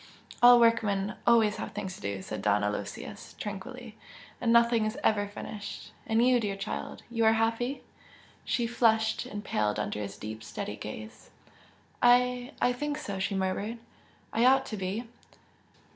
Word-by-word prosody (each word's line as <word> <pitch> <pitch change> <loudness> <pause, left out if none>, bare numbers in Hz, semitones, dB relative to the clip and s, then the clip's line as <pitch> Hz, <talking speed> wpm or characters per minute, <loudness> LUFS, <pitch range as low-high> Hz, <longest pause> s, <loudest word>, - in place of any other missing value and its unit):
"All 245 0 +9
workmen 210 -4 +2
always 225 -3 +5
have - - -5
things 190 -1 -4
to - - -13
do!" 100 -1 -4
said 110 - -5
Don 105 0 +2
Aloysius, 105 -1 -5
tranquilly 225 +3 -7 0.4
"And 230 - +2
nothing 235 -1 +5
is 215 +5 -4
ever 205 -1 +2
finished! 205 0 -7 0.2
And 225 +1 +3
you, 255 -1 +5
dear 205 -3 -2
child! 195 +2 -5
you 230 -1 0
are 220 0 +6
happy?" 230 +4 0 0.6
She 240 - 0
flushed 225 -2 +2
and 205 0 -7
paled 105 -1 0
under 105 0 -2
his 100 -1 -6
deep, 110 +1 -7
steady 105 -1 -5
gaze. 110 0 -9 0.7
"I 250 +1 +3
I 245 - +3
think 295 +3 -3
so!" 200 -10 -5
she 200 +1 -1
murmured 195 +4 -2 0.6
"I 230 - +2
ought 265 +1 +5
to - - 0
be!" 195 +4 -3
220 Hz, 160 wpm, -29 LUFS, 190-240 Hz, 0.7 s, All